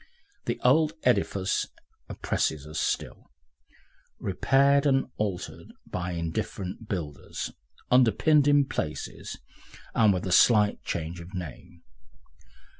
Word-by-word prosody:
The - - -2
old 155 +5 +4
edifice 100 -5 +1 0.4
oppresses 75 -2 -1
us 75 +1 -5
still, - - -3 0.9
repaired 140 +8 +3
and 135 -1 +3
altered 100 -4 -4
by 90 0 -4
indifferent 90 +5 -4
builders, 75 -7 -4 0.4
underpinned 130 +5 +4
in 145 -1 +5
places, 75 - -5 0.6
and 110 -3 +5
with 90 -1 -1
a 95 - -2
slight 105 +2 +5
change 85 +1 -4
of 85 +3 -10
name. 85 0 -8
100 Hz, 105 wpm, -27 LUFS, 85-130 Hz, 0.9 s, in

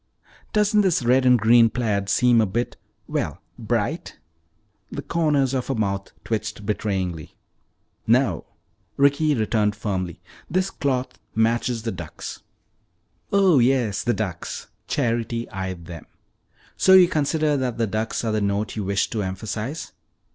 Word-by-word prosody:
"Doesn't 210 0 +3
this 185 -9 +2
red 130 +2 +3
and 125 0 +6
green 115 +1 +5
plaid 105 -4 -1
seem 120 +2 +4
a 110 - +2
bit 120 +6 -2 0.3
well, - - -3 0.2
bright?" - - -2 0.7
The - - -5
corners 150 -5 +1
of 130 -2 -1
her 135 - -1
mouth 100 -3 -2
twitched 110 -1 -3
betrayingly. 95 -6 -2 0.7
"No," 115 -6 +2 0.5
Ricky 140 +2 +3
returned 110 -2 +1
firmly. 95 -5 -3 0.3
"This 185 +2 0
cloth 130 -2 -2 0.2
matches 115 +1 +1
the 115 - -2
ducks." 85 -4 -8 0.9
"Oh, 190 -7 +5
yes, 120 -4 +2
the 120 -1 0
ducks," 95 -6 -5 0.2
Charity 115 -3 -1
eyed 95 -4 -5
them. 85 -3 -9 0.7
"So 190 - +5
you 185 -1 +9
consider 155 -2 +1
that 130 -3 -2
the 115 - +1
ducks 110 +3 -2
are 115 - 0
the 110 0 0
note 100 +1 -1
you 105 - -2
wish 100 +1 0
to 110 - -1
emphasize?" 105 - -4
115 Hz, 140 wpm, -23 LUFS, 100-135 Hz, 0.9 s, you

